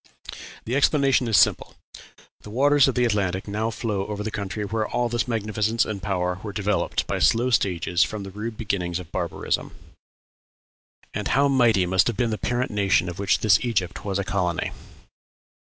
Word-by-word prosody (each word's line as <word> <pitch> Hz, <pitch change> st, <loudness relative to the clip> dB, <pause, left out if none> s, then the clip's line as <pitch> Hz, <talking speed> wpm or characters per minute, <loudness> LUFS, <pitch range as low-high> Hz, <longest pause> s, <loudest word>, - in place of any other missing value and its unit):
The 120 Hz, -, -2 dB
explanation 140 Hz, -3 st, +3 dB
is 110 Hz, -4 st, +3 dB
simple: -, -, +2 dB, 0.7 s
the -, -, -11 dB
waters 140 Hz, +5 st, +4 dB
of 135 Hz, -, 0 dB
the 125 Hz, -1 st, +2 dB
Atlantic 100 Hz, -4 st, -1 dB
now 105 Hz, +2 st, -1 dB
flow 105 Hz, -4 st, -3 dB
over 105 Hz, -1 st, -4 dB
the 110 Hz, -, -4 dB
country 105 Hz, 0 st, -4 dB
where 110 Hz, +1 st, -2 dB
all 120 Hz, -1 st, -1 dB
this 120 Hz, -1 st, -1 dB
magnificence 110 Hz, 0 st, 0 dB
and 105 Hz, -3 st, -5 dB
power 90 Hz, -2 st, -1 dB
were 105 Hz, -, -6 dB
developed 105 Hz, +1 st, -1 dB
by -, -, -2 dB
slow 120 Hz, +3 st, +3 dB
stages 90 Hz, -5 st, +2 dB
from 105 Hz, -2 st, -4 dB
the 95 Hz, -, -8 dB
rude 110 Hz, +3 st, -6 dB
beginnings 90 Hz, -5 st, -2 dB
of 90 Hz, -3 st, -9 dB
barbarism. -, -, -3 dB, 1.4 s
And -, -, -3 dB
how 140 Hz, +2 st, +3 dB
mighty 120 Hz, -8 st, +3 dB
must 95 Hz, +2 st, +3 dB
have 120 Hz, -, -2 dB
been 120 Hz, -2 st, +1 dB
the 110 Hz, -, -3 dB
parent 125 Hz, +1 st, -1 dB
nation 100 Hz, -3 st, +2 dB
of 90 Hz, -, -8 dB
which 100 Hz, -, +1 dB
this 110 Hz, -, +5 dB
Egypt 95 Hz, -7 st, -2 dB
was 100 Hz, -2 st, -2 dB
a 100 Hz, -, -1 dB
colony! 90 Hz, -2 st, -1 dB
105 Hz, 180 wpm, -24 LUFS, 95-115 Hz, 1.4 s, this